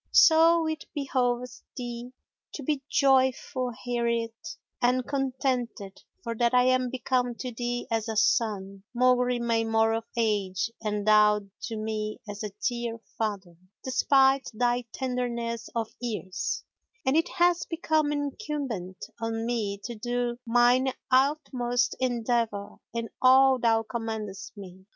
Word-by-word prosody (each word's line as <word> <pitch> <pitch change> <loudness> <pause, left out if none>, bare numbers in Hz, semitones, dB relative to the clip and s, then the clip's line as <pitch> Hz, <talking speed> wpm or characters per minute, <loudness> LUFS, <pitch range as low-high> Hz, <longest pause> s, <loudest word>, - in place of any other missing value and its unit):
So 330 +1 +6
it 315 -1 -3
behoveth 250 -3 -1 0.2
thee 240 0 -6 0.4
to 290 - -6
be 290 0 -1
joyful 260 -2 +2
hereat 235 -2 -1 0.5
and 250 +1 +2
contented, 255 -7 -2 0.2
for 230 -2 -3
that 240 +1 +2
I 250 - +6
am 255 -1 +2
become 250 -1 -1
to 250 +1 -5
thee 240 +1 -3
as 225 0 -1
a 220 - -2
son, 200 -3 +1
maugre 250 0 +3
my 230 -1 +1
more 225 0 +2
of 225 0 -2
age, 205 -2 0
and 210 -1 -2
thou 210 0 +5 0.2
to 225 -1 -5
me 215 0 -3
as 205 +1 -6
a 210 - -3 0.2
dear 235 -2 -3 0.2
father, 200 -6 -3 0.3
despite 265 +1 +3
thy 245 +1 +1
tenderness 235 -3 -3
of 225 -1 -2
years, 210 -6 -3 0.4
and 265 +2 +2
it 325 +1 +2
hath 350 -1 +2
become 315 -3 +1
incumbent 280 -10 -4 0.2
on 225 0 -2
me 220 -4 -1
to 235 - -5
do 240 +1 -2
mine 245 +3 +4 0.2
utmost 255 -3 +2
endeavour 235 -4 -1
in 230 0 -3
all 260 0 +6
thou 225 -1 +3
commandest 220 -3 -5
me. 190 -1 -11
240 Hz, 130 wpm, -27 LUFS, 225-255 Hz, 0.5 s, So